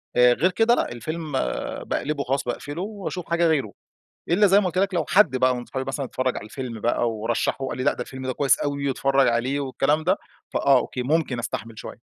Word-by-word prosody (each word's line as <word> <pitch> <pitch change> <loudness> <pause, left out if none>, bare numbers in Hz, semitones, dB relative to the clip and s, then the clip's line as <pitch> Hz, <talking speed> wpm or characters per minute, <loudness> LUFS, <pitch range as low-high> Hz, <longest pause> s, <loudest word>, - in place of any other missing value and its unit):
آآ 125 0 +6
غير 180 +8 +2
كده 225 +4 +3
لأ، - - -1
الفيلم 155 +5 -5 0.5
باقلبه 145 -1 -2
خلاص، 135 +2 -1
باقفله 145 +7 -4
وأشوف 195 -4 -5
حاجة 170 0 +3
غيره، 140 -10 +1 0.6
إلا 205 +4 +5
زي 195 +2 +6
ما 200 - -1
قُلت 180 0 -2
لَك 195 0 +2
لو 170 -3 0
حد 190 -10 +4
بقى 130 0 +3
من 125 - -4
اصحابي 130 +1 -5
مثلًا 135 +1 -2
اتفرَّج 130 0 -2
على 105 - -6
الفيلم 115 0 -6
بقى، 120 0 +1
ورشَّحه 115 +4 -1
وقال - - -4
لي: 130 - -2
"لأ 140 - +3
ده - - -6
الفيلم 130 0 -6
ده 130 - -1
كويس 140 +1 +3
أوي، 140 -1 -2
واتفرج 135 0 +2
عليه، 125 +4 +1
والكلام 140 +3 0
ده" 185 +4 +2 0.4
فآه، 140 -1 +4
أوكي 125 0 -2
ممكن 145 -3 0
أستحمل 115 -1 -5
شوية. - - -8
135 Hz, 220 wpm, -24 LUFS, 125-165 Hz, 0.6 s, آآ